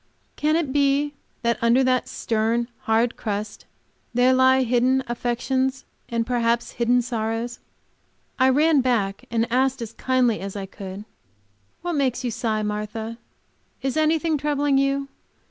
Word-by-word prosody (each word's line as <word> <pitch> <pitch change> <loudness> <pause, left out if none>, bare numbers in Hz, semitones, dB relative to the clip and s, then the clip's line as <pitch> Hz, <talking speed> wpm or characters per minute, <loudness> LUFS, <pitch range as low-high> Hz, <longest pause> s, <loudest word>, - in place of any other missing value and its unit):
Can 305 +1 +1
it 310 -5 0
be 285 0 +2 0.3
that 235 0 0
under 235 +3 +4
that 255 -1 +1
stern 225 +1 0
and 235 - -5 0.2
hard 230 +2 +2
crust 210 -1 -4 0.5
there 250 +1 +5
lie 260 0 +5
hidden 255 +2 +2
affections 260 +3 -1 0.2
and 230 -1 0
perhaps 235 -1 0
hidden 245 +1 +2
sorrows? 230 0 -3 0.8
I 260 0 +5
ran 295 +2 +4
back 210 -6 0
and 230 -1 +1
asked, 265 +1 +2
as 230 -1 -6
kindly 250 -4 +1
as 195 +1 -6
I 200 -1 -4
could, 195 +1 -8 0.8
"What 350 0 -2
makes 270 -4 0
you 245 - -1
sigh, 220 -2 -1
Martha? 215 +2 -4 0.6
Is 270 0 -1
anything 315 0 +2
troubling 290 -1 +1
you? 275 0 0
245 Hz, 145 wpm, -23 LUFS, 230-270 Hz, 0.8 s, there